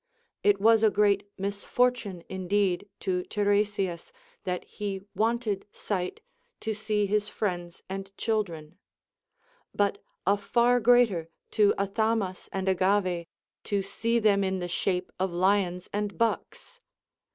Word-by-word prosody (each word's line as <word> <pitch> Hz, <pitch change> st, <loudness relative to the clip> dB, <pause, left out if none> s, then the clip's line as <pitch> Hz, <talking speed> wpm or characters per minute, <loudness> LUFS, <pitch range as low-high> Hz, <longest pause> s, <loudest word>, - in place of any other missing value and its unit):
It 205 Hz, -1 st, +4 dB
was 225 Hz, +2 st, +5 dB
a 220 Hz, -, +6 dB
great 205 Hz, -1 st, +2 dB
misfortune 200 Hz, 0 st, 0 dB
indeed 190 Hz, +1 st, 0 dB
to 185 Hz, -2 st, 0 dB
Tiresias, 205 Hz, -4 st, 0 dB, 0.3 s
that 180 Hz, -1 st, -2 dB
he 200 Hz, -2 st, -4 dB
wanted 220 Hz, -1 st, 0 dB
sight 185 Hz, -3 st, -3 dB, 0.4 s
to 220 Hz, -, -1 dB
see 215 Hz, -1 st, 0 dB
his 210 Hz, +1 st, +1 dB
friends 175 Hz, -5 st, -3 dB
and 195 Hz, +1 st, -6 dB
children; 180 Hz, -7 st, -2 dB, 1.0 s
but 200 Hz, -1 st, +1 dB, 0.2 s
a 200 Hz, +2 st, +4 dB
far 240 Hz, +4 st, +3 dB
greater 225 Hz, -8 st, +4 dB, 0.2 s
to 210 Hz, -2 st, +4 dB
Athamas 200 Hz, -1 st, -1 dB
and 190 Hz, 0 st, -3 dB
Agave, 185 Hz, -2 st, +2 dB, 0.4 s
to 200 Hz, -1 st, 0 dB
see 230 Hz, +4 st, 0 dB
them 205 Hz, -3 st, +3 dB
in 190 Hz, 0 st, 0 dB
the 175 Hz, -1 st, -3 dB
shape 180 Hz, +1 st, -1 dB
of 190 Hz, 0 st, 0 dB
lions 180 Hz, 0 st, +1 dB
and 205 Hz, 0 st, -2 dB
bucks. 230 Hz, -, -2 dB
200 Hz, 125 wpm, -28 LUFS, 185-215 Hz, 1.0 s, a